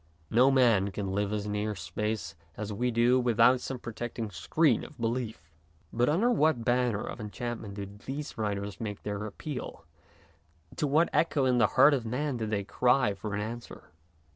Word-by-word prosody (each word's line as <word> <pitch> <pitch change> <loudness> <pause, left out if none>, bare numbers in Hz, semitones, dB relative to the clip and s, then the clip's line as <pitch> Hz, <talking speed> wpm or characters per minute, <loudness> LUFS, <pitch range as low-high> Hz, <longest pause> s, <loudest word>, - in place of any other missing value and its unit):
No 125 +4 +5
man 115 -7 +4
can 100 -1 -4
live 100 +1 -1
as 105 -1 -2
near 105 0 -2
space 95 -1 -3 0.2
as 105 0 -4
we 125 +5 0
do 120 +2 +3
without 120 +1 +4
some 130 - -4
protecting 120 -2 -5
screen 125 - +2
of 145 - -12
belief. 115 -7 -3 0.4
But 120 +3 +2
under 205 +11 +3
what 155 - +2
banner 120 -3 +1
of - - -7
enchantment 110 -1 -5
do 100 -1 -4
these 125 +9 -7
writers 100 -2 -3
make 105 -3 -5
their 105 0 -3
appeal, 140 +5 -7 0.9
to 150 - 0
what 155 +5 +3
echo 150 -4 +2
in 125 -1 +3
the 115 - +5
heart 140 +3 +8
of 130 -4 0
man 130 +3 -2
do 110 -2 -3
they 105 -2 -1
cry 125 +1 +2
for 100 +1 -5
an 105 - -2
answer? 115 +3 -7
115 Hz, 175 wpm, -29 LUFS, 105-125 Hz, 0.9 s, heart